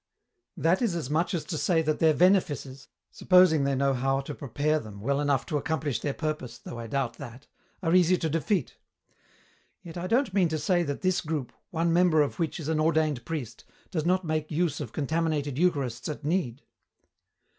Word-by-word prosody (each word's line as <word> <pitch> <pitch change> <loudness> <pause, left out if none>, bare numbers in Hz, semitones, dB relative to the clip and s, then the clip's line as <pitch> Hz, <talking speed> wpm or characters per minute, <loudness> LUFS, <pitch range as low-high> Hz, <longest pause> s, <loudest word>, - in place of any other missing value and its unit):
"That 170 +6 +2
is 220 -8 +1
as 150 -5 -4
much 165 +4 +1
as 155 -3 -3
to 155 -2 -4
say 165 -3 +2
that 155 -1 0
their 160 -2 +4
venefices 150 -7 +1 0.2
supposing 180 -6 +4
they 140 0 +1
know 135 +1 +2
how 135 +1 0
to 140 +2 -7
prepare 145 +3 -1
them 105 -6 -10
well 140 +7 0
enough 145 -2 +1
to 150 - -1
accomplish 145 -2 -2
their 145 -2 -3
purpose, 155 -6 -4
though 120 - -9
I 115 - -6
doubt 130 -1 -2
that 120 +4 -10 0.4
are 165 -1 +1
easy 180 0 +5
to 165 - -1
defeat. 165 - -1 1.1
Yet 170 -1 -9
I 175 +1 -3
don't 235 -2 +1
mean 190 -3 +3
to 160 - -1
say 175 +4 +1
that 145 -4 -3
this 185 0 +1
group, 150 -5 -4 0.2
one 165 0 0
member 170 -3 +4
of 145 - -5
which 165 0 -2
is 155 - -6
an 160 -1 0
ordained 155 -5 +1
priest, 135 -8 -5 0.3
does 160 -5 -1
not 185 +2 +1
make 155 -1 -2
use 160 -2 0
of 135 -7 -5
contaminated 150 -2 -1
Eucharists 145 -10 0
at 150 0 -6
need." 150 -7 -1
155 Hz, 195 wpm, -27 LUFS, 140-170 Hz, 1.1 s, easy